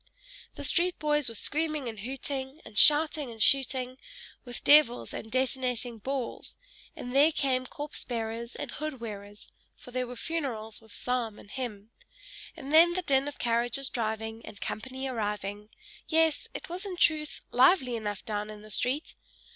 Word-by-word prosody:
The - - -7
street 355 +1 +3
boys 295 -3 +2
were 230 - -8
screaming 305 +2 0
and 220 -2 -6
hooting, 265 +4 -4
and - - -12
shouting 300 +2 +6
and 225 -1 -10
shooting, 260 0 +2 0.4
with 245 -1 -8
devils 290 -5 +5
and 220 - -7
detonating 250 -2 0
balls 265 +1 -2 0.4
and 245 +1 -6
there 295 +4 +6
came 255 -4 0
corpse 295 +3 -4
bearers 230 0 -4
and - - -5
hood 305 -3 -5
wearers 205 -2 -8 0.3
for 250 - -13
there 250 0 -2
were 250 - -7
funerals 235 -7 -3
with 220 -1 -18
psalm 240 -3 -2
and 200 - -14
hymn 225 -5 -5 0.7
and 290 -2 -6
then 335 +2 +8
the 370 +1 -2
din 275 -2 +2
of 290 - -6
carriages 240 +3 0
driving 220 -1 -3
and 215 -2 -10
company 260 +4 -4
arriving: 210 -3 -3 0.4
yes, 320 -1 +2
it - - -6
was, 355 +3 -4
in 385 -3 -5
truth, 310 -3 +2
lively 255 -1 +5
enough 210 -3 -4
down 210 -2 -3
in 210 0 -9
the 215 - -10
street. 260 +9 0
255 Hz, 165 wpm, -29 LUFS, 225-290 Hz, 0.7 s, then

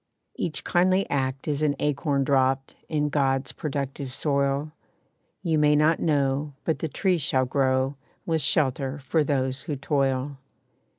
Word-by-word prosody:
Each 160 - -3
kindly 185 +2 +2
act 135 0 -1
is 150 -1 -1
an 150 -2 +2
acorn 140 -1 0
dropped 135 0 +1
In 150 -2 0
God's 135 -2 0
productive 140 -2 -4
soil 140 +1 0 0.7
You 160 -4 +1
may 150 0 +4
not 155 +2 +3
know, 145 -1 0
but 160 - 0
the 160 - -2
tree 180 +4 +1
shall 130 -2 +1
grow, 130 0 +1 0.3
With 160 -2 +1
shelter 135 -1 +1
for 140 +3 0
those 130 -2 -1
who 145 - -4
toil. 135 0 -1
140 Hz, 140 wpm, -26 LUFS, 135-150 Hz, 0.7 s, may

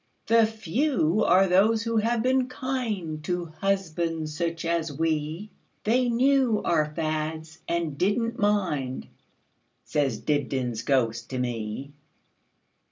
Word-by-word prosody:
The 230 -1 +5
few 220 - 0
are 185 +2 +5
those 215 +5 +3
who 230 -1 -1
have 225 +1 +1
been 255 0 +2
kindTo 180 -11 -3
husbands 165 -5 -1
such 170 0 -2
as 165 -2 0
we; 160 +5 -2 0.3
They 245 +3 +2
knew 255 -2 +3
our 155 -3 +2
fads, 160 0 -3
and 165 -4 -2
did 200 +4 +2
n't 230 +1 -3
mind,"Says 145 - -3
Dibdin's 130 -6 -1
ghost 115 -4 0
to 130 - -4
me. 120 +2 -3
170 Hz, 110 wpm, -26 LUFS, 150-220 Hz, 0.3 s, The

